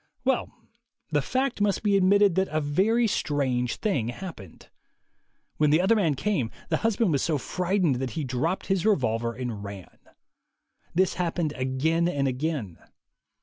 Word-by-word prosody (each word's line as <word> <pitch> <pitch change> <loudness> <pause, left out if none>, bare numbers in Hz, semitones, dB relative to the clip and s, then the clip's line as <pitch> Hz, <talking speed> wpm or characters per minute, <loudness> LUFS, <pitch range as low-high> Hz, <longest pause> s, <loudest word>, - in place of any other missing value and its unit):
Well, 265 -1 +1 0.6
the 145 -1 +2
fact 255 - -1
must 205 0 +1
be 205 -2 +3
admitted 200 0 +4
that 190 +2 +1
a 155 - -1
very 195 +11 +2
strange 130 - 0
thing 185 - -1
happened. 120 - -9 0.9
When 150 -1 +3
the 155 +3 +4
other 190 +5 +4
man 170 -9 +2
came, 135 - -1 0.2
the - - +2
husband 225 -3 +1
was 140 -3 +1
so 155 -3 +1
frightened 180 -1 0
that 130 0 -2
he 155 - -1
dropped 135 +8 -1
his 195 -3 0
revolver 115 - +1
and 120 -5 -5
ran. 100 -2 -9 1.0
This 185 +1 +3
happened 170 -3 -1
again 150 +6 0
and 140 -5 0
again. 130 - -3
160 Hz, 150 wpm, -26 LUFS, 130-195 Hz, 1.0 s, admitted